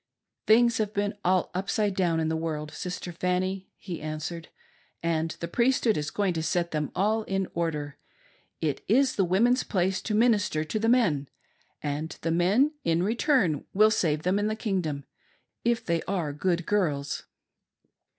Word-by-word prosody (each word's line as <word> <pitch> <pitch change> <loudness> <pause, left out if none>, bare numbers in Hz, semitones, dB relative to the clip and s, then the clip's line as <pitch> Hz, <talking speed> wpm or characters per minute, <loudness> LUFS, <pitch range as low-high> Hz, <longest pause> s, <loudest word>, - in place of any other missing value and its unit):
Things 235 +1 +5
have 215 -1 -1
been 205 0 0
all 185 0 +2
upside 195 +2 0
down 175 -4 +1
in 160 - 0
the 160 - 0
world, 155 -2 -3
Sister 180 0 -5
Fanny," 185 +2 -1
he 175 -5 -7
answered, 155 +2 -5 0.3
" - - -38
and 165 -1 0
the 170 - -3
Priesthood 235 +2 +2
is 150 0 -2
going 200 -3 0
to 160 - -2
set 170 +2 0
them 150 -1 -2
all 215 +4 +2
in 195 -1 -1
order. 150 -4 -3 0.6
It 155 -3 -1
is 260 +5 +3
the 195 - +2
women's 230 +8 +3
place 190 -1 0
to 215 - -2
minister 210 -8 +3
to 215 +7 -3
the 225 +1 +1
men, 165 - +2 0.5
and 150 +2 -3
the 165 - 0
mien, 200 - +3
in 165 +1 +2
return, 220 - +2
will 215 +2 +6
save 155 -7 +1
them 185 +3 +2
in 205 - 0
the 215 - -1
Kingdom, 180 -10 -2 0.6
if 235 0 +1
they 170 -1 0
are 175 -7 -1
good 175 +3 0
girls." 150 -9 -1
180 Hz, 170 wpm, -27 LUFS, 160-210 Hz, 0.6 s, will